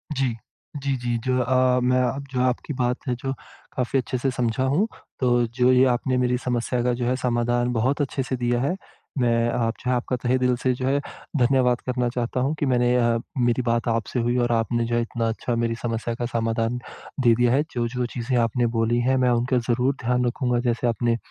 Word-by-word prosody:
जी। 130 -4 0 0.5
जी, 140 -1 0
जी, 120 -1 -1
जो 130 +2 0
अ, 125 0 +3
मैं 125 +1 +3
अ, 125 +1 0 0.2
जो 125 - +1
आपकी 130 +3 -1
बात 125 0 +1
है 125 - +1
जो 135 +2 -4 0.4
काफ़ी 130 +1 0
अच्छे 130 +1 -3
से 135 +2 0
समझा 120 0 -1
हूँ। 150 +12 +2 0.3
तो 120 -2 +3
जो 125 0 +4
ये 130 +1 +5
आपने 130 +1 -1
मेरी 125 0 +1
समस्या 125 0 -1
का 125 0 +2
जो 120 0 -2
है 125 +1 +1
समाधान 120 -1 0
बहुत 130 +6 +1
अच्छे 135 -1 -1
से 130 - -2
दिया 120 0 0
है। 145 +7 0 0.4
मैं 120 -1 +2
आप 115 -1 0
जो 125 - -1
है 125 - +3
आपका 125 +1 -2
तहे 125 +1 0
दिल 125 -1 +2
से 130 -1 +3
जो 130 +1 -4
है 140 +1 +2 0.4
धन्यवाद 125 -1 +3
करना 125 -1 0
चाहता 120 +1 -1
हूँ 135 +4 +1
कि - - +1
मैंने 125 -2 +2
अ, 120 -1 +3 0.2
मेरी 120 0 +2
बात 115 0 0
आपसे 115 +2 -1
हुई 120 +1 +1
और 120 -1 +1
आपने 115 0 +1
जो 120 - -1
है 120 - +2
इतना 115 0 -2
अच्छा 115 +2 -2
मेरी 115 0 0
समस्या 115 0 -2
का 120 - -3
समाधान 115 0 -1 0.4
दे 120 -3 +5
दिया 120 0 +3
है। 140 +3 +3
जो-जो 120 +1 -2
चीज़ें 125 +1 -1
आपने 120 +1 +1
बोली 115 +1 +2
हैं 130 0 +3
मैं - - +4
उनका 125 +2 +1
ज़रूर 125 +3 +2
ध्यान 125 +1 +1
रखूँगा 125 0 0
जैसे 120 +1 0
आपने 115 +1 +1
125 Hz, 220 wpm, -24 LUFS, 120-130 Hz, 0.5 s, ये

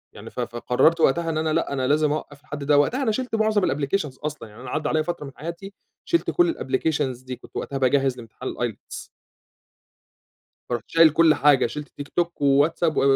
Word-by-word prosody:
يعني - - -10
ف - - -9
فقررت 125 +7 +1
وقتها 165 +3 +2
إن 160 - -1
أنا 155 0 0
لأ - - 0
أنا 130 -2 -1
لازم 150 +1 +2
أوقّف 145 -1 -5
لحد 145 -1 -7
ده 145 +1 +3
وقتها 245 - +2
أنا 225 - +2
شِلت 250 +1 -2
معظم 215 -1 +2
الapplications 145 0 -2
أصلًا 150 -7 -5
يعني 105 +3 -14
أنا 130 - -8
عدّى 155 +4 -2
عليَّ 155 0 +1
فترة 170 -2 -4
من 135 - -8
حياتي 170 +6 -7 0.3
شِلت 340 - +1
كل 350 -1 +2
الapplications 130 -2 -1
دي 130 0 -5
كنت 125 - -18
وقتها 140 - -3
باجهِّز 135 0 +2
لامتحان 120 +2 -7
الIELTS 120 -4 -6 1.6
فرُحت 120 -3 -3
شايل 165 -1 +6
كل 155 +1 +5
حاجة 145 -4 +4
شِلت 150 +5 -7
تيك 145 0 -9
توك، 170 -2 -2
وواتساب 145 +4 +3
و - - +3
150 Hz, 195 wpm, -24 LUFS, 130-165 Hz, 1.6 s, شايل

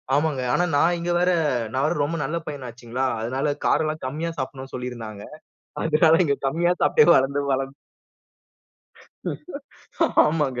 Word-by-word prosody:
ஆமாங்க. 145 -3 +1
ஆனா 175 - +2
நான் 170 +5 +3
இங்க 175 +1 -2
வர 180 +1 +3 0.4
நான் 130 +1 0
வேற 155 - +1
ரொம்ப 165 +4 -2
நல்ல 160 +5 -2
பையனாச்சுங்களா, 125 -2 -4 0.2
அதனால 135 +5 -1
காரம் 160 - +3
எல்லா 155 0 -1
கம்மியா 155 +5 -3
சாப்டணும்னு 130 0 -6
சொல்லி 125 0 -4
இருந்தாங்க. 110 -4 -8 0.6
அதனால 160 +1 +4
இங்க 140 -3 +1
கம்மியா 170 +5 +2
சாப்ட்டே 455 - +5
வளர்ந்து, 135 +2 +2
வளர்ந்து 135 +1 -2 2.5
ஆமாங்க. 145 -6 0
140 Hz, 135 wpm, -23 LUFS, 130-160 Hz, 2.5 s, சாப்ட்டே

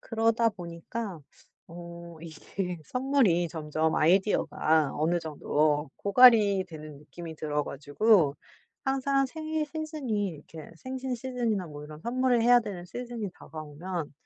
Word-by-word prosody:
그러다 230 0 +2
보니까 180 +2 -6 0.5
어 170 0 -10
이게 175 +2 -5
선물이 250 - +2
점점 155 0 -1
아이디어가 160 -4 +2
어느 165 +4 +1
정도 150 -1 0
고갈이 205 -3 +6
되는 155 -3 -9
느낌이 160 +2 -9
들어 150 -1 -1
가지고 150 +2 +2 0.5
항상 275 0 +1
생일 315 +2 -3
시즌이 295 -9 -3
이렇게 155 -1 -10
생신 260 +5 -4
시즌이나 235 -6 -2
뭐 145 -1 -9
이런 150 0 -10
선물을 245 +2 +1
해야 245 +1 +7
되는 195 -6 -6
시즌이 235 0 -5
다가오면 155 +1 -6
185 Hz, 290 characters per minute, -28 LUFS, 155-240 Hz, 0.5 s, 해야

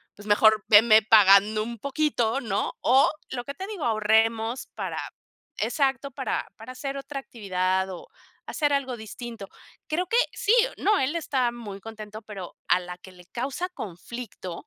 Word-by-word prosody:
pues, 205 +1 -13
mejor 215 +1 +5
veme 220 +1 +7
pagando 210 0 +6
un 235 -1 -7
poquito, 275 -4 0
¿no? 210 -4 -2
O 260 +3 +5 0.2
lo 245 -2 -4
que 280 - -6
te 380 - -6
digo, 405 -8 -6
ahorremos 225 +2 +1
para - - -4 0.6
exacto, 275 -1 0
para - - -3
para 255 - -9
hacer 275 +1 -5
otra 275 0 -6
actividad 190 -5 -1
o 180 - -9 0.4
hacer 290 -2 0
algo 265 -3 -1
distinto. 220 -1 -8 0.4
Creo 350 +3 -1
que 465 - +1 0.2
sí, 420 - +1 0.2
no, 425 0 +2
él 270 +5 0
está 260 -7 0
muy 210 -5 -8
contento, 215 0 -9
pero 195 -5 -9
a 180 - +4
la 180 0 -8
que 185 +1 -14
le 180 -1 -16
causa 265 - -4
conflicto. 200 - -8
225 Hz, 160 wpm, -26 LUFS, 205-275 Hz, 0.6 s, veme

